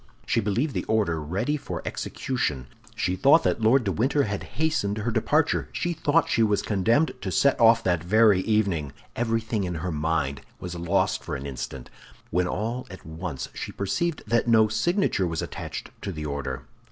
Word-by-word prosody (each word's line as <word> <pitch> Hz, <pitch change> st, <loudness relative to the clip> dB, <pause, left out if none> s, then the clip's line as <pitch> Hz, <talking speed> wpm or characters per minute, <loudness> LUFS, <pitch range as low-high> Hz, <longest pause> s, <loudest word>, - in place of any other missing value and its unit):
She -, -, +1 dB
believed 115 Hz, +8 st, 0 dB
the -, -, -2 dB
order 100 Hz, -8 st, +1 dB
ready 95 Hz, -, -1 dB
for -, -, -6 dB
execution. 75 Hz, -, -2 dB, 0.3 s
She 90 Hz, -, 0 dB
thought 140 Hz, -, +5 dB
that -, -, 0 dB
Lord 120 Hz, +4 st, +4 dB
de 100 Hz, -, 0 dB
Winter 135 Hz, +8 st, +2 dB
had 100 Hz, -4 st, -3 dB, 0.2 s
hastened 150 Hz, -10 st, 0 dB
her 110 Hz, +2 st, -1 dB
departure; -, -, +1 dB
she 175 Hz, -, -1 dB
thought 160 Hz, 0 st, +2 dB
she 115 Hz, -, +1 dB
was 105 Hz, -2 st, +2 dB
condemned 115 Hz, -, +2 dB
to 95 Hz, -, -3 dB
set 140 Hz, +9 st, +3 dB
off 115 Hz, 0 st, +6 dB
that 85 Hz, -3 st, +1 dB
very 105 Hz, +1 st, +5 dB
evening. 95 Hz, -9 st, 0 dB, 0.2 s
Everything 115 Hz, -2 st, -1 dB
in 90 Hz, -2 st, -3 dB
her 85 Hz, +3 st, -3 dB
mind 75 Hz, -3 st, -1 dB, 0.2 s
was 90 Hz, -1 st, -6 dB
lost 85 Hz, +3 st, 0 dB
for -, -, -4 dB
an 65 Hz, -, -6 dB
instant; 65 Hz, -1 st, -6 dB, 0.4 s
when 90 Hz, +1 st, +1 dB
all 115 Hz, +7 st, -3 dB
at 95 Hz, -, -11 dB
once 80 Hz, -4 st, -5 dB
she -, -, -5 dB
perceived 150 Hz, -, -2 dB
that 120 Hz, +1 st, +1 dB
no 110 Hz, -2 st, +5 dB
signature 115 Hz, -, +1 dB
was 80 Hz, -2 st, -2 dB
attached -, -, -6 dB
to 100 Hz, -, -4 dB
the 75 Hz, -3 st, -5 dB
order. 70 Hz, -3 st, -4 dB
105 Hz, 180 wpm, -26 LUFS, 85-120 Hz, 0.4 s, off